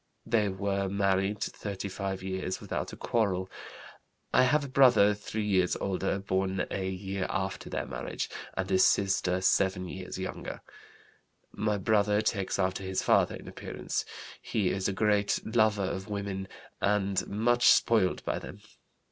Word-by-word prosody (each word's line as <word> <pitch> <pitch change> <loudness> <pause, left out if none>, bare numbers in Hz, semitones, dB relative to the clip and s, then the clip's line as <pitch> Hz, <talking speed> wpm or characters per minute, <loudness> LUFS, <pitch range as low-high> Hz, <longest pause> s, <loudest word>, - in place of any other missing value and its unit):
They 105 -3 +2
were 100 0 -1
married 100 +1 +1
thirty 100 -1 -5
five 95 -1 -4
years 95 -1 -3
without - - -4
a - - -8
quarrel. 95 -5 0 0.8
I - - +6
have 145 +3 +2
a - - -5
brother 125 -6 +5
three 105 +1 -4
years 95 -3 +2
older, 95 0 -1
born 95 -1 -1
a 95 -1 -2
year 95 0 -3
after 95 -1 -3
their - - -2
marriage, - - -4 0.3
and 95 0 -2
a 95 - +4
sister 95 -2 +3
seven 95 -1 +2
years 95 0 -6
younger. 95 0 -5 0.9
"My 105 -1 -1
brother 105 +1 +2
takes 105 -3 -1
after 95 0 0
his 95 0 -2
father - - +3
in - - -11
appearance. - - -4 0.4
He 100 -5 0
is 95 -1 -1
a - - 0
great 105 +1 +2
lover 110 -3 +2
of 95 +2 -4
women 100 -2 -3 0.3
and 100 -1 +1
much 120 +4 +2
spoiled 110 -6 +4
by - - -1
them. - - -10
100 Hz, 150 wpm, -29 LUFS, 95-105 Hz, 0.9 s, I